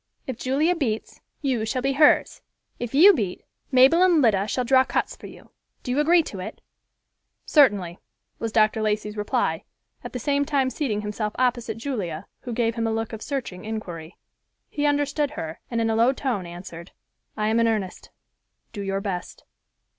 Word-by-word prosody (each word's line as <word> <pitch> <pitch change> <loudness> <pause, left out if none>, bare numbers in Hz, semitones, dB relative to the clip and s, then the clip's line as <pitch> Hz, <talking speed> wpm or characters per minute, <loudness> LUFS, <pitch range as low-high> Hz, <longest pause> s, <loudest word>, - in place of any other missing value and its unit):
If 260 - -4
Julia 295 +7 +1
beats, 230 -9 -3 0.2
you 255 -5 0
shall 245 +3 -2
be 275 0 +1
hers; 300 +2 +4 0.4
if 245 +1 -4
you 380 +8 +8
beat, 205 - -3 0.3
Mabel 265 +6 +6
and 360 -3 +5
Lida 210 -6 +3
shall 250 +4 -1
draw 260 +1 +5
cuts - - -2
for - - -11
you. - - -15 0.3
Do 250 - -3
you 265 - +1
agree 330 +3 +4
to 200 - -7
it?" 185 - -7 0.9
"Certainly," 205 - +3 0.4
was 225 - -3
Dr. 215 0 +3
Lacey's 210 0 -1
reply, 210 -1 -1 0.4
at - - -8
the - - -2
same 285 +3 +1
time 275 -3 0
seating 225 -9 -2
himself 210 0 -3
opposite 245 -2 0
Julia, 210 - -4
who 245 - -7
gave 230 0 0
him 230 0 -1
a - - 0
look 225 0 -3
of 220 - -6
searching 245 -11 -4
inquiry. 180 -7 -6 0.5
He 295 -1 0
understood 290 0 +1
her 160 0 -5
and 235 - -1
in 225 - +1
a - - 0
low 235 +4 +4
tone 240 -10 -2
answered, 170 0 -10 0.4
"I 215 0 0
am 225 +1 +2
in 230 - +3
earnest. 210 -5 -3 0.6
Do 205 - -5
your 195 0 -2
best." 190 -3 -5
230 Hz, 180 wpm, -24 LUFS, 210-275 Hz, 0.9 s, you